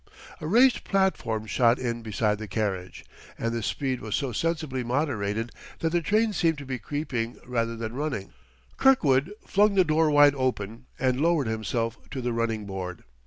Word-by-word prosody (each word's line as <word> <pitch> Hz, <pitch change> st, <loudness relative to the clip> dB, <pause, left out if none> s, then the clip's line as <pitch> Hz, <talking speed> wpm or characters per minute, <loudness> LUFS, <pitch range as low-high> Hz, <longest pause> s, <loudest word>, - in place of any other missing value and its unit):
A 155 Hz, -, -5 dB
raised 245 Hz, +8 st, +5 dB
platform 155 Hz, -, 0 dB
shot 120 Hz, +2 st, +3 dB
in 120 Hz, -2 st, -3 dB
beside 105 Hz, -1 st, 0 dB
the 110 Hz, -, -6 dB
carriage, 95 Hz, -3 st, -3 dB, 0.3 s
and 115 Hz, 0 st, -2 dB
the 115 Hz, -, -2 dB
speed 130 Hz, +3 st, -2 dB
was 110 Hz, -1 st, -2 dB
so 135 Hz, -4 st, -1 dB
sensibly 155 Hz, -1 st, -1 dB
moderated 120 Hz, -4 st, -1 dB, 0.3 s
that 165 Hz, -, -1 dB
the 175 Hz, 0 st, +2 dB
train 215 Hz, +5 st, +2 dB
seemed 165 Hz, -4 st, +2 dB
to 140 Hz, -, -8 dB
be 130 Hz, -1 st, -4 dB
creeping 125 Hz, -2 st, -3 dB
rather 115 Hz, -2 st, -1 dB
than 115 Hz, 0 st, -5 dB
running. 135 Hz, -8 st, -3 dB, 0.4 s
Kirkwood 155 Hz, -, +4 dB
flung 205 Hz, 0 st, +3 dB
the 190 Hz, -, +6 dB
door 155 Hz, 0 st, +3 dB
wide 145 Hz, -1 st, +6 dB
open 125 Hz, -3 st, -2 dB
and 130 Hz, 0 st, +1 dB
lowered 165 Hz, -3 st, +3 dB
himself 115 Hz, +1 st, -2 dB
to 135 Hz, -, -5 dB
the 120 Hz, -1 st, -1 dB
running 115 Hz, -2 st, -1 dB
board. 95 Hz, -2 st, -6 dB
125 Hz, 170 wpm, -26 LUFS, 115-155 Hz, 0.4 s, the